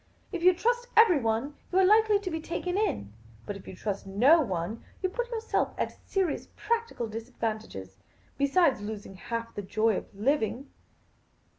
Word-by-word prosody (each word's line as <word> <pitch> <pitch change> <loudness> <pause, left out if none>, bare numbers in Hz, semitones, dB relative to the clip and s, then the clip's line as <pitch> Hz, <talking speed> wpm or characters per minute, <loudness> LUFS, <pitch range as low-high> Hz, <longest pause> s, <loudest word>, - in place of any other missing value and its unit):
If 360 -4 -3
you 365 +1 +6
trust 485 +5 0
everyone, 280 - +4 0.2
you 365 - +1
are 380 - +6
likely 430 +1 +5
to 370 -3 -4
be 320 0 -3
taken 355 +2 -3
in; 345 - -1 0.3
but 205 - -4
if 195 - -11
you - - -8
trust 200 0 -4
no 255 +12 +5
one, 195 - -3 0.2
you 370 - +2
put 485 +5 -3
yourself 455 -2 -1
at - - -1
a - - -20
serious 375 -6 0
practical 460 - -1
disad 225 +3 -8
vantage, 215 - -4 0.5
besides 280 - +3
losing 205 -2 -6
half 230 +4 -5
the 205 - -4
joy 215 +2 +1
of - - -5
living." 255 +3 0
275 Hz, 170 wpm, -29 LUFS, -, 0.5 s, you